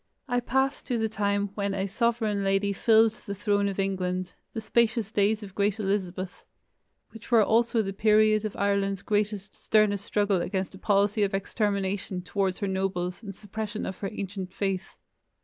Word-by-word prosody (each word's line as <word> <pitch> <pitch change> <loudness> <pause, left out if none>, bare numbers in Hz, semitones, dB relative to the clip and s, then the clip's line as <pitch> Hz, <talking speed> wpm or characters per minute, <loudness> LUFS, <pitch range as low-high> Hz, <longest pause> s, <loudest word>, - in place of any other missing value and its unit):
I 245 -1 +1
pass 265 +3 0
to 245 -3 -2
the 220 -1 +1
time 205 -2 0
when 200 -1 -2
a 195 0 -1
sovereign 220 -1 0
lady 195 +1 +1
filled 225 +2 +5
the 220 -2 -8
throne 205 0 +1
of 195 - -3
England, 185 -2 -1 0.2
"the - - -4
spacious 225 0 +1
days 210 +1 +2
of 195 -2 -9
great 205 +2 0
Elizabeth," 190 -2 -2 0.7
which 225 -1 -12
were 230 -3 +6
also 230 +1 +2
the 195 -1 -4
period 215 +1 +4
of 215 - -4
Ireland's 200 -1 0
greatest, 210 -1 -1
sternest 205 -2 +2
struggle 205 -3 +1
against 190 +1 -2
a 190 - -11
policy 205 +1 +2
of 200 -1 +1
extermination 195 -2 -1
towards 190 0 -1
her 200 - -2
nobles 190 -1 -2
and 200 -4 -8
suppression 215 +1 -5
of 190 - -5
her 195 - -3
ancient 195 -3 -5
faith. 195 -1 -3
200 Hz, 170 wpm, -27 LUFS, 195-215 Hz, 0.7 s, were